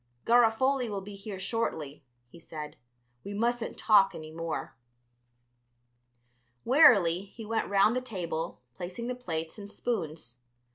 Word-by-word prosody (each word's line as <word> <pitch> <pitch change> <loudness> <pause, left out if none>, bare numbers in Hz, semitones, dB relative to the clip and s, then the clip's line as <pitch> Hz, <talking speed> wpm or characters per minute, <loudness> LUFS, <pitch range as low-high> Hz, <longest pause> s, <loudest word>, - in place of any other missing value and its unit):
"Garofoli 240 +2 +3
will 200 -2 -3
be 205 +2 -9
here 200 -1 -7
shortly," 175 - -3 0.2
he 170 - -15
said; 155 -2 -8 0.5
"we 200 0 -6
mustn't 235 +2 -1
talk 200 -3 +5
any 155 0 -8
more." 165 0 -4 1.9
Wearily 200 - +6
he 220 +3 -11
went 225 +1 -1
round 200 +3 +4
the 255 - 0
table, 175 - -4
placing 180 - -6
the 250 - -2
plates 165 -7 -5
and 200 0 -9
spoons. 155 - -4
200 Hz, 130 wpm, -29 LUFS, 165-230 Hz, 1.9 s, Wearily